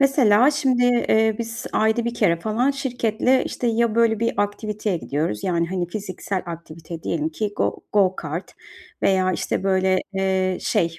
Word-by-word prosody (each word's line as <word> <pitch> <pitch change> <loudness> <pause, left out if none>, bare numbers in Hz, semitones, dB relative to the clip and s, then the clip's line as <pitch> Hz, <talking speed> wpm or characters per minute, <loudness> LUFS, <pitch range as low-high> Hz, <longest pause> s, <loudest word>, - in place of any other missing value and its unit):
Mesela 265 -3 +5
şimdi, 260 -4 +1
eee, 220 -3 +3
biz 230 +1 -5
ayda 220 +2 +2
1 235 0 -2
kere 180 -7 +2
falan 230 +7 +1
şirketle, 250 -2 0
işte, 245 - -3
ya, 230 -1 +1
böyle, 230 -2 +3
bir 230 - +1
aktiviteye 205 -1 -2
gidiyoruz. 145 -8 -3
Yani, 170 -2 +1
hani, 180 -2 -2
fiziksel 190 0 -4
aktivite 165 0 -8
diyelim 160 -1 -1
ki 205 +5 -3
go - - 0 0.2
go 190 -3 +3
kart 165 +4 -5 0.5
veya, 185 -1 +3
işte, 190 - -2
böyle, 190 -1 +2
eee, 190 -1 0
şey 165 -1 0
205 Hz, 160 wpm, -22 LUFS, 180-235 Hz, 0.5 s, Mesela